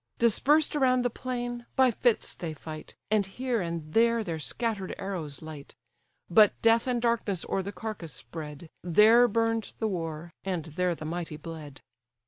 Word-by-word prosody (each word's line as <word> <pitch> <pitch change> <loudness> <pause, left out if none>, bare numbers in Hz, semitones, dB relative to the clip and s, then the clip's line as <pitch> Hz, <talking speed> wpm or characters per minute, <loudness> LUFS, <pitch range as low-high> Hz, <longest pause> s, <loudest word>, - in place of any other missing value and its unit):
Dispersed 290 +7 +3
around 255 -3 +3
the 245 - +1
plain, 245 -1 -4
by 260 -1 +5
fits 235 0 +1
they 160 -3 -5
fight, 155 +1 -9 0.2
And 215 -1 +4
here 235 +4 -2
and 165 -3 -4
there 230 0 +4
their 165 -5 -4
scatter'd 210 +2 -3
arrows 165 -9 -5
light: 155 -3 -9 0.5
But 210 +4 +5
death 230 +2 +4
and 245 -1 +1
darkness 230 -6 0
o'er 195 - 0
the 200 +2 -5
carcase 190 -4 -6
spread, 150 +6 -8
There 215 +8 +6
burn'd 225 -1 0
the 220 - 0
war, 165 -3 -4
and 180 -5 -2
there 175 +3 -1
the 155 - -8
mighty 165 -1 -4
bled. 155 -4 -9
195 Hz, 160 wpm, -28 LUFS, 160-235 Hz, 0.5 s, There